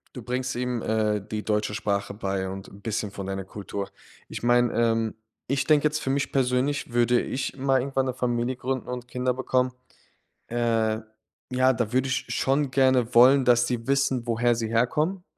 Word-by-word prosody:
Du 125 Hz, -, -7 dB
bringst 125 Hz, +1 st, -2 dB
ihm, 125 Hz, -1 st, -2 dB
äh, 110 Hz, -1 st, +1 dB
die 105 Hz, +1 st, -5 dB
deutsche 105 Hz, -1 st, 0 dB
Sprache 100 Hz, -2 st, -1 dB
bei 95 Hz, -2 st, -2 dB
und 95 Hz, 0 st, -7 dB
'n 100 Hz, -, -14 dB
bisschen 105 Hz, -1 st, -3 dB
von 100 Hz, -1 st, -6 dB
deiner 95 Hz, 0 st, -3 dB
Kultur. 100 Hz, +1 st, -6 dB, 0.4 s
Ich -, -, -7 dB
meine, 120 Hz, 0 st, +4 dB
ähm, 115 Hz, -1 st, +1 dB, 0.3 s
ich 135 Hz, +1 st, 0 dB
denke 150 Hz, -2 st, +4 dB
jetzt 155 Hz, -, -3 dB
für -, -, -4 dB
mich 140 Hz, +1 st, 0 dB
persönlich, 130 Hz, 0 st, 0 dB
würde 120 Hz, 0 st, +3 dB
ich 135 Hz, -, -4 dB
mal 135 Hz, -1 st, +2 dB
irgendwann 135 Hz, 0 st, -1 dB
'ne 130 Hz, -, -2 dB
Familie 120 Hz, 0 st, -1 dB
gründen 130 Hz, +1 st, -3 dB
und 125 Hz, 0 st, -6 dB
Kinder 125 Hz, +1 st, 0 dB
bekommen, 130 Hz, 0 st, 0 dB, 0.8 s
äh, 115 Hz, -2 st, +1 dB, 0.5 s
ja, 130 Hz, +1 st, +3 dB
da 120 Hz, -1 st, -2 dB
würde 130 Hz, +1 st, +2 dB
ich 130 Hz, -, -1 dB
schon 135 Hz, +1 st, +1 dB
gerne 130 Hz, -3 st, +2 dB
wollen, 130 Hz, +3 st, +7 dB
dass 120 Hz, -1 st, +5 dB
die 120 Hz, -2 st, -3 dB
wissen, 135 Hz, -3 st, +1 dB
woher 120 Hz, +1 st, +2 dB
sie 115 Hz, -1 st, -2 dB
herkommen, 150 Hz, -, 0 dB
120 Hz, 185 wpm, -26 LUFS, 110-130 Hz, 0.8 s, wollen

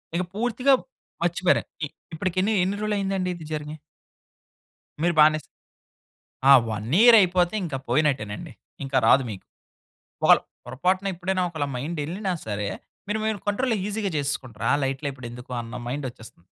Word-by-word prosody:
ఇగ 180 Hz, -, +1 dB
పూర్తిగా 245 Hz, +5 st, +2 dB, 0.5 s
మర్చిపోయారు. 175 Hz, +1 st, +2 dB, 0.2 s
ఇ -, -, +2 dB, 0.3 s
ఇప్పటికి 180 Hz, +3 st, -3 dB, 0.3 s
ఎన్ని 190 Hz, +2 st, 0 dB
రోజులు 215 Hz, -1 st, 0 dB
అయిందండి 195 Hz, -2 st, -1 dB
ఇది 165 Hz, -3 st, -10 dB
జరిగి? 150 Hz, 0 st, -4 dB, 1.3 s
మీరు 175 Hz, -, +3 dB
బానే 155 Hz, 0 st, +6 dB, 1.1 s
ఆ! 140 Hz, -, +9 dB, 0.2 s
1 110 Hz, +2 st, -4 dB
ఇయర్ 235 Hz, -1 st, +9 dB
అయిపోతే, 180 Hz, 0 st, +2 dB
ఇంక 160 Hz, -6 st, -3 dB
పోయినట్టేనండి. 135 Hz, -9 st, 0 dB, 0.3 s
ఇంక 135 Hz, 0 st, -7 dB
రాదు 135 Hz, +2 st, +6 dB
మీకు. 95 Hz, -, -9 dB, 0.8 s
ఒకల -, -, +8 dB, 0.3 s
పొరపాటున 185 Hz, +8 st, 0 dB
ఎప్పుడైనా 185 Hz, +1 st, -1 dB
ఒకళ్ళ 155 Hz, -4 st, -3 dB
మైండ్ 155 Hz, +6 st, -4 dB
ఎళ్ళినా 190 Hz, +3 st, -2 dB
సరే, 105 Hz, -1 st, -2 dB, 0.4 s
మీరు 215 Hz, +1 st, -1 dB
మీరు 220 Hz, -2 st, -1 dB
కంట్రోల్‌లో 225 Hz, +1 st, +1 dB
ఈసీగా 205 Hz, -3 st, -2 dB
చేసేసుకుంటారు. 130 Hz, -6 st, -3 dB
ఆ! -, -, +5 dB
లైట్‌‌లే 135 Hz, +2 st, -2 dB
ఇప్పుడెందుకు 125 Hz, 0 st, -9 dB
అన్న 120 Hz, +1 st, -7 dB
మైండొచ్చేస్తది. 120 Hz, -9 st, -7 dB
160 Hz, 135 wpm, -25 LUFS, 130-190 Hz, 1.3 s, ఆ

